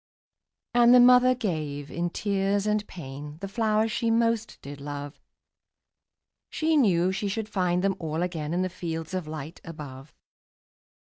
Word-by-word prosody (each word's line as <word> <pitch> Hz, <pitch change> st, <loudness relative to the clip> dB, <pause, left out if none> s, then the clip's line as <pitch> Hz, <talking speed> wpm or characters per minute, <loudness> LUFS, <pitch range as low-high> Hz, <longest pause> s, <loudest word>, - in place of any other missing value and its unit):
'' -, -, -63 dB
And 240 Hz, 0 st, +6 dB
the -, -, +8 dB
mother 250 Hz, +1 st, +7 dB
gave, 155 Hz, -, -3 dB
in 175 Hz, +1 st, -2 dB
tears 200 Hz, +1 st, 0 dB
and 210 Hz, 0 st, 0 dB
pain, 145 Hz, -2 st, -8 dB
The 195 Hz, -, -5 dB
flowers 220 Hz, +1 st, +1 dB
she 230 Hz, +1 st, 0 dB
most 230 Hz, -1 st, +1 dB
did 140 Hz, 0 st, -9 dB
love; 145 Hz, 0 st, -7 dB, 1.3 s
She 320 Hz, 0 st, +1 dB
knew 185 Hz, -, +3 dB
she 200 Hz, +2 st, -2 dB
should 210 Hz, +2 st, -3 dB
find 180 Hz, -3 st, 0 dB
them 195 Hz, -1 st, +1 dB
all 160 Hz, +1 st, -2 dB
again 160 Hz, -4 st, -3 dB
In 180 Hz, +2 st, 0 dB
the 185 Hz, -, -1 dB
fields 165 Hz, -1 st, -5 dB
of 185 Hz, -4 st, -3 dB
light 155 Hz, +1 st, -7 dB
above. 145 Hz, -4 st, -9 dB
185 Hz, 155 wpm, -27 LUFS, 155-215 Hz, 1.3 s, the